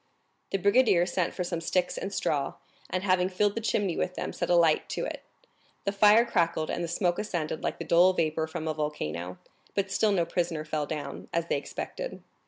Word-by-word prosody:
The 195 Hz, -, 0 dB
brigadier 200 Hz, -2 st, +4 dB
sent 180 Hz, 0 st, 0 dB
for 180 Hz, -, -1 dB
some 170 Hz, -1 st, -3 dB
sticks 180 Hz, +2 st, 0 dB
and 195 Hz, -, -4 dB
straw, 145 Hz, -7 st, -1 dB, 0.3 s
and 185 Hz, +1 st, -2 dB
having 185 Hz, -1 st, +2 dB
filled 200 Hz, +2 st, +1 dB
the 230 Hz, -, -3 dB
chimney 205 Hz, -5 st, 0 dB
with 180 Hz, -, -2 dB
them, -, -, -4 dB
set -, -, -3 dB
a 175 Hz, -, +5 dB
light 165 Hz, -3 st, +3 dB
to -, -, -2 dB
it. -, -, -5 dB, 0.6 s
The 200 Hz, -, +1 dB
fire 210 Hz, +3 st, +6 dB
crackled, 165 Hz, -6 st, 0 dB
and 175 Hz, -, -2 dB
the -, -, -2 dB
smoke 175 Hz, +1 st, 0 dB
ascended 170 Hz, -7 st, -3 dB
like -, -, -2 dB
the -, -, -6 dB
dull 175 Hz, +2 st, +6 dB
vapor 160 Hz, -2 st, 0 dB
from 160 Hz, 0 st, -5 dB
a 155 Hz, -, 0 dB
volcano; 90 Hz, -, -3 dB, 0.4 s
but 195 Hz, -1 st, 0 dB
still 215 Hz, +2 st, +3 dB
no 180 Hz, -4 st, +2 dB
prisoner 165 Hz, -2 st, -2 dB
fell 150 Hz, -1 st, -2 dB
down, 145 Hz, -2 st, -5 dB
as 170 Hz, 0 st, 0 dB
they -, -, +2 dB
expected. -, -, -6 dB
175 Hz, 205 wpm, -28 LUFS, 160-195 Hz, 0.6 s, fire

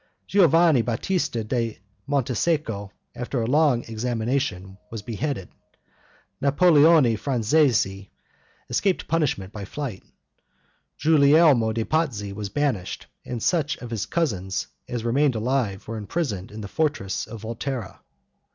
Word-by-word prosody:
Giovanni 165 Hz, -7 st, +5 dB
Batista 120 Hz, -, -1 dB
da 115 Hz, 0 st, -2 dB, 0.3 s
Montesecco, 130 Hz, -, 0 dB, 0.2 s
after 125 Hz, +1 st, -3 dB
a 115 Hz, -, 0 dB
long 140 Hz, -1 st, +3 dB
examination, 115 Hz, -4 st, -2 dB
was 110 Hz, -3 st, -7 dB
beheaded; 115 Hz, -2 st, -3 dB, 0.9 s
Napoleone 145 Hz, -3 st, +5 dB
Franzesi 115 Hz, -7 st, +1 dB, 0.6 s
escaped 195 Hz, -3 st, 0 dB
punishment 140 Hz, -, -1 dB
by 105 Hz, -, -6 dB
flight; 125 Hz, -1 st, -5 dB, 1.0 s
Giulielmo 145 Hz, -5 st, +5 dB
de' 110 Hz, 0 st, -2 dB
Pazzi 120 Hz, -11 st, -1 dB
was 105 Hz, 0 st, -5 dB
banished, 105 Hz, -7 st, -2 dB, 0.2 s
and 120 Hz, -3 st, -5 dB
such 150 Hz, -5 st, +1 dB
of 120 Hz, -2 st, -9 dB
his 110 Hz, -3 st, -2 dB
cousins 95 Hz, -, -1 dB, 0.2 s
as 120 Hz, -2 st, -3 dB
remained 135 Hz, +2 st, +2 dB
alive 110 Hz, -3 st, -1 dB
were 115 Hz, 0 st, -4 dB
imprisoned 105 Hz, -, -3 dB
in 110 Hz, +1 st, -8 dB
the 100 Hz, -, -6 dB
fortress 145 Hz, -7 st, -1 dB
of 115 Hz, -2 st, -9 dB
Volterra. 115 Hz, 0 st, -5 dB
120 Hz, 115 wpm, -24 LUFS, 105-150 Hz, 1.0 s, Giovanni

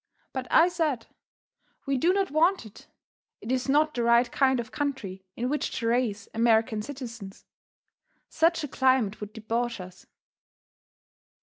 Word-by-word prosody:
But 260 Hz, -2 st, -4 dB
I 330 Hz, -, +6 dB
said: 315 Hz, -9 st, -1 dB, 0.8 s
"We 275 Hz, -1 st, 0 dB
do 330 Hz, +8 st, +3 dB
not 390 Hz, -2 st, 0 dB
want 330 Hz, 0 st, +2 dB
it; 215 Hz, -, -14 dB, 0.5 s
it 230 Hz, -, -6 dB
is 260 Hz, +1 st, -1 dB
not 305 Hz, +2 st, +3 dB
the 240 Hz, -, -2 dB
right 235 Hz, +1 st, +3 dB
kind 265 Hz, -2 st, +2 dB
of 230 Hz, -1 st, -5 dB
country 230 Hz, -11 st, -4 dB
in 245 Hz, -, -2 dB
which 295 Hz, +3 st, -1 dB
to 230 Hz, -, -3 dB
raise 230 Hz, -3 st, 0 dB
American 225 Hz, -1 st, +2 dB
citizens. 230 Hz, -5 st, -8 dB, 0.8 s
Such 330 Hz, 0 st, +1 dB
a -, -, -2 dB
climate 260 Hz, -7 st, +1 dB
would 210 Hz, 0 st, -6 dB
debauch 230 Hz, +1 st, -3 dB
us. 185 Hz, 0 st, -11 dB
245 Hz, 145 wpm, -27 LUFS, 225-285 Hz, 0.8 s, I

